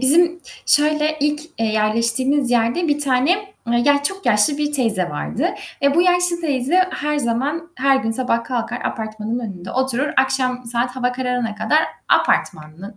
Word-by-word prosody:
bizim 340 +6 +5 0.3
şöyle: 305 +1 +3
İlk, 295 +1 0 0.2
eee, 225 - 0
yerleştiğimiz 230 +5 +1
yerde 245 +8 +1
bir 295 0 +1
tane, 295 +10 +1 0.3
ya 285 0 +3
çok 390 +6 -2
yaşlı 235 +6 +4
bir 295 0 -1
teyze 220 -10 +1
vardı. 225 - -2 0.4
E, 280 0 +3
bu 345 - +4
yaşlı 355 -1 +2
teyze 290 +2 +1
her 300 0 -2
zaman, 285 +7 -2
her 270 +1 +3
gün 225 -4 -2
sabah 230 0 -1
kalkar 245 -1 -3
apartmanın 220 0 -4
önünde 190 -6 -7
oturur, 260 +2 0
akşam 260 -1 0
saat 240 +2 -2
hava 250 -1 0
kararana 250 -3 -2
kadar 295 +8 +1 0.3
apartmanın 160 +7 -1
260 Hz, 155 wpm, -19 LUFS, 230-295 Hz, 0.4 s, bizim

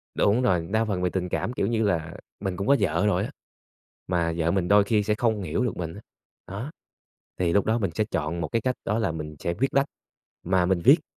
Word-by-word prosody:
Đúng 105 +5 +3
rồi, 90 -8 +1
đa 110 +1 +2
phần 95 -4 -2
về 90 - +1
tình 90 -1 -2
cảm, 120 - -2
kiểu - - 0
như 115 -1 +1
là, 80 -5 0 0.3
mình 95 -3 -3
cũng 100 - -3
có 140 - +6
vợ 90 -1 +1
rồi 105 - +2
á, - - -5 0.8
mà 85 -2 0
vợ 85 0 +1
mình 90 -1 0
đôi 100 0 +6
khi 105 0 +2
sẽ 105 +1 +1
không 110 -3 0
hiểu 85 +9 -1
được 120 - -2
mình 85 -1 -4
á, 105 - -9 0.5
đó, 110 +10 -5 0.7
thì 85 -2 +1
lúc 100 - +3
đó 110 +2 +2
mình 100 -6 -1
sẽ 110 - +1
chọn 85 -3 -2
một 80 - -2
cái 115 -1 -1
cách 130 -1 +1
đó 110 - 0
là 110 -8 0
mình 75 -1 -6
sẽ 85 - -2
viết 135 +6 -1
lách 140 +1 +4 0.6
mà 90 0 +2
mình 95 -2 +2
viết - - +7
95 Hz, 245 wpm, -26 LUFS, 85-110 Hz, 0.8 s, viết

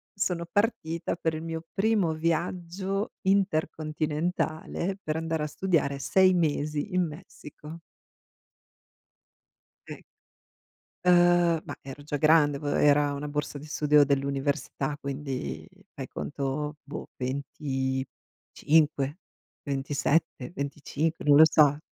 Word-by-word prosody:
sono 175 -3 -1
partita 170 -7 0
per 165 -2 -1
il 155 - -5
mio 165 0 -4
primo 200 -5 +2
viaggio 175 +5 -2
intercontinentale, 160 -1 -1
per 155 0 -3
andare 160 -1 -2
a - - -1
studiare 150 -4 0
6 185 +6 +4
mesi 150 0 0
in 180 - +3
Messico. 155 -1 -10 2.1
Sì. - - -8 1.1
Uhm, 175 -2 +5
ma - - -7
ero 135 +1 -9
già 145 0 -3
grande, 150 -2 +4
v 145 - -9
era 145 0 +3
una 140 +1 -4
borsa 145 0 -3
di 150 - -10
studio 150 -1 +4
dell'università, 140 0 -1
quindi, 140 -2 -4 0.3
fai 135 -2 -6
conto, 145 +2 -4
boh, 145 - -8
25, 135 +2 -1 0.4
27, 140 0 -1
25, 145 +3 -3
non 145 -1 +6
lo 160 - +10
so. 145 -2 +4
150 Hz, 105 wpm, -27 LUFS, 145-170 Hz, 2.1 s, lo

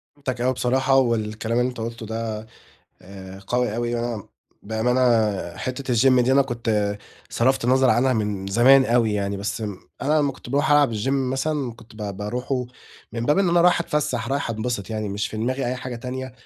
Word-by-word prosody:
فهمتك 130 -4 -4
أوي 130 +1 +2
بصراحة، 130 +2 +1
والكلام 115 -2 0
اللي 125 +1 +2
أنت 125 - -9
قلتُه 115 0 -5
ده 110 0 -4 0.6
آآ، 95 0 -11
قوي 125 -3 0
أوي 120 0 -1
يعني 120 0 -1
وأنا 115 -4 -5 0.3
بأمانة 110 +4 0 0.6
حتة 130 0 -3
الgym 130 +2 +5
دي 130 +2 +2
أنا 140 +1 +5
كنت 110 -5 -1 0.3
صرفت 130 +1 +1
النظر 130 +1 +4
عنها 130 +2 +3
من 105 -4 -2
زمان 130 +6 +6
أوي 115 -3 +2
يعني، 100 -1 -1
بس 100 +3 -4
م 105 -3 -4 0.3
أنا 150 +3 +2
لمّا 140 -2 +1
كنت 120 - -12
باروح 145 +2 +1
ألعب 145 -6 +4
الgym 105 +5 -2
مثلًا 135 0 -1
كنت 115 -1 -17
ب 105 -2 -5
باروحُه 125 +5 -3 0.5
من 115 0 -3
باب 150 - +3
إن 195 -3 +3
أنا 170 0 +4
رايح 180 0 +4
أتفسّح، 130 -8 -1
رايح 140 -3 -1
أنبسط 110 -2 -3
يعني 110 -2 -3
مش 100 +1 -2
في 110 - -7
دماغي 130 +4 -1
أي 125 - -1
حاجة 125 -1 -6
تانية 130 +1 -6
120 Hz, 195 wpm, -23 LUFS, 110-130 Hz, 0.6 s, زمان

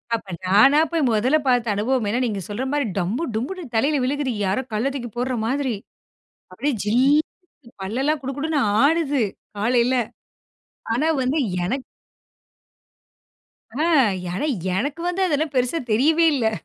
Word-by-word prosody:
அப்ப 200 -4 -8 0.2
நானா 215 +11 +6
போய் 330 -2 +1
முதல்ல 250 +8 +3
பார்த்த 240 -4 +2
அனுபவம் 235 +2 0
ஏன்னா 240 +4 0
நீங்க 205 -4 -2
சொல்ற 205 +6 -3
மாரி 290 -3 0
டம்பு, 200 - -1
டொம்புன்னு 320 +10 -4
தலையில 285 +6 +2
விழுகுது. 275 0 -1
யாரோ 195 +7 0
கல்ல 245 +6 0
தூக்கி 240 -4 -5
போடுற 255 +1 -1
மாதிரி. 265 -1 -1 0.8
அப்படியே 275 +9 -1
ஜில்லுன்னு 275 - 0
பல்லெல்லாம் 270 +9 -1
குடு 270 +1 -3
குடுன்னு 305 0 0 0.2
ஆடுது 290 -4 +2 0.3
காலையில. 240 +4 +2 1.0
ஆனா 305 +6 +1
வந்து 265 +5 0 0.3
எனக்கு 260 +8 -2 1.9
அ. - - -3 0.5
ஆனா 285 - -2 0.3
எனக்கு 285 - -2
வந்து 355 +2 -1
அதெல்லாம் 300 -1 -1
பெருசா 250 +6 +1
தெரியவே 310 +9 +4
இல்லை. 225 -5 +1
260 Hz, 135 wpm, -22 LUFS, 230-295 Hz, 1.9 s, நானா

